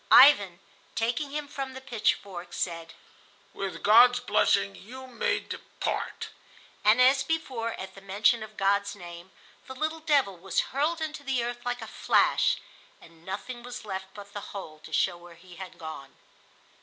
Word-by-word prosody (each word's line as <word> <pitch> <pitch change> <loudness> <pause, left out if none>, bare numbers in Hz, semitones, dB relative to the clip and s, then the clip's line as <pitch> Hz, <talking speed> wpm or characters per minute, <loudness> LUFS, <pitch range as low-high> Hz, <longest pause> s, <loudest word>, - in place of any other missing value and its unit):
Ivan, 205 -11 +8 0.4
taking 240 +5 0
him 295 +1 -4
from 275 -2 -5
the - - -6
pitchfork, 210 -7 -2
said: 165 -2 -3 0.6
"With 195 -1 -5
God's 245 +3 +7
blessing 100 - +2
you 255 - -10
may 250 -2 -1
depart"; - - -4 0.5
and, 215 +4 +5
as 265 +2 +6
before 265 -6 -2
at 190 0 -7
the 195 - -13
mention 210 +4 +2
of 215 0 -9
God's 200 +1 +1
name, 175 -1 -10 0.4
the 260 - -8
little 315 +4 -2
devil 285 - +2
was 185 +2 -2
hurled 310 +4 0
into 310 -1 -4
the 265 -4 0
earth 240 0 -4
like 245 -1 -2
a - - -7
flash, - - +3 0.4
and 165 -1 -18
nothing 210 +7 -6
was 245 -1 -8
left 190 -2 -4
but 200 -1 -11
the 205 - -4 0.2
hole 155 -5 -8
to - - -13
show 175 -2 +2
where 175 0 -14
he 175 +1 -15
had 190 -2 -9
gone. 150 -4 -8
215 Hz, 165 wpm, -28 LUFS, 190-260 Hz, 0.6 s, Ivan